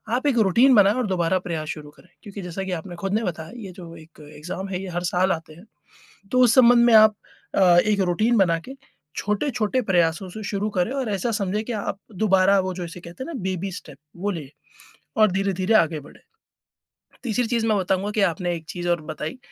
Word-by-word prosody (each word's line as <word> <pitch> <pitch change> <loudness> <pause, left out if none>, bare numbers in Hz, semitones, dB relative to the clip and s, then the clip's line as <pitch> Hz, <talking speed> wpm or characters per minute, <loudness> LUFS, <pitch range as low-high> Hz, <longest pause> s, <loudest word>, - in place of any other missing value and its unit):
आप 260 - -2
एक 265 -4 +2
रूटीन 250 +8 +5
बनाना, 210 +4 +4
दोबारा 185 -1 +1
प्रयास 165 -4 -4
शुरू 150 -2 -6
करें, 175 +4 -21
क्योंकि 200 -1 -8
जैसा 180 +1 -5
कि 190 - -5
आपने 175 +2 -9
ख़ुद 195 0 -3
ने 220 +2 +1
बताया, 160 -3 -5
ये 205 -6 -8
जो 170 -2 -11
एक 160 0 -16 0.2
एक्ज़ाम 185 +5 -6
है 185 -1 -3
ये 195 - -6
हर 175 - -2
साल 185 +2 +2
आते 160 -3 -4
हैं। 170 +4 -15 0.7
तो 255 - +2
उस 235 -2 +5
संबंध 240 -1 +6
में 235 - +4
आप 215 -1 +7 0.4
अ, - - +2 0.2
एक 210 -1 +1
रूटीन 215 +6 +2
बना 175 -4 +3
के, 265 - -7 0.4
छोटे-छोटे 215 +2 -1
प्रयासों 175 0 +1
से 215 +4 -8
शुरू 205 +1 -1
करें 180 +5 +1
और 265 -5 -2
ऐसा 200 +4 -1
समझें 210 0 -1
कि 240 - -4
आप 200 - -4 0.3
दोबारा 195 -1 +4
वो 185 - -3
जो 180 -1 -5
इसे 170 +1 -9
कहते 175 +9 -9
हैं - - -8
ना 335 - -6
बेबी 190 0 -3
स्टेप 140 -5 -10 0.2
वो 200 +4 -2
ले 160 -7 -6 0.7
और 215 -2 +5
धीरे-धीरे 195 +2 0
आगे 160 -6 +3
बढ़े। 145 - -15 1.1
तीसरी 240 +1 0
चीज़ 230 -1 0
मैं 215 -2 +2
बताऊँगा 190 +2 -1
कि 215 - 0
आपने 175 +2 -3
एक 160 - -10
चीज़ 175 -1 -4
और 175 -1 +1
बताई 155 +10 -5
190 Hz, 215 wpm, -23 LUFS, 175-215 Hz, 1.1 s, आप